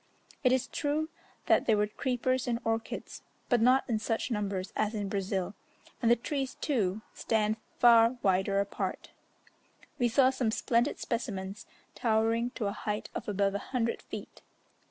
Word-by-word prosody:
It 255 - +5
is 260 -1 +2
true 305 +2 -1 0.4
that - - +3
there 220 -2 +4
were 210 - +3
creepers 255 +3 -1
and 235 -1 +1
orchids, 225 0 -3 0.3
but 245 -3 +3
not 255 +3 +4
in 225 -4 0
such 225 +3 -2
numbers 200 -3 -2
as 215 +1 0
in 205 -2 -2
Brazil, 195 -1 -2 0.5
and 230 - +3
the 235 - +7
trees, 270 +3 -3
too, 215 -7 -1
stand 215 -1 0 0.2
far 235 0 +6
wider 190 +1 +2
apart. 200 0 -3 0.9
We 245 - +4
saw 255 +3 +4
some 255 -3 0
splendid 235 +4 +1
specimens, 210 -4 -4 0.3
towering 225 +1 +1
to 225 - -2
a 200 - 0
height 210 0 -4
of - - -5
above 200 -1 +1
a 200 - -1
hundred 235 -1 -2
feet. - - -9
225 Hz, 155 wpm, -30 LUFS, 205-245 Hz, 0.9 s, the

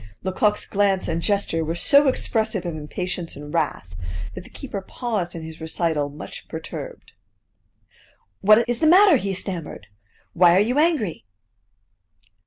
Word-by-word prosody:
Lecoq's 205 +3 +1
glance 195 -2 +1
and 165 0 -1
gesture 195 -3 0
were 160 +2 -2
so 280 +10 +5
expressive 220 -6 0
of 170 -2 -3
impatience 175 +3 -5
and 145 +1 -9
wrath 145 - -2 0.4
that 105 - -8
the - - -15
keeper 225 -8 -6
paused 205 -4 -3
in 165 - -6
his 160 0 -10
recital 160 -2 -1
much 145 +1 -10
perturbed. - - -8 1.3
"What 215 +3 +5
is 240 -1 -1
the 315 - +3
matter?" 370 -1 +7
he 195 -4 -3
stammered. 180 -4 -6 0.5
"Why 175 0 +5
are - - +5
you 245 +7 +2
angry?" 295 - +1
190 Hz, 145 wpm, -23 LUFS, 165-220 Hz, 1.3 s, matter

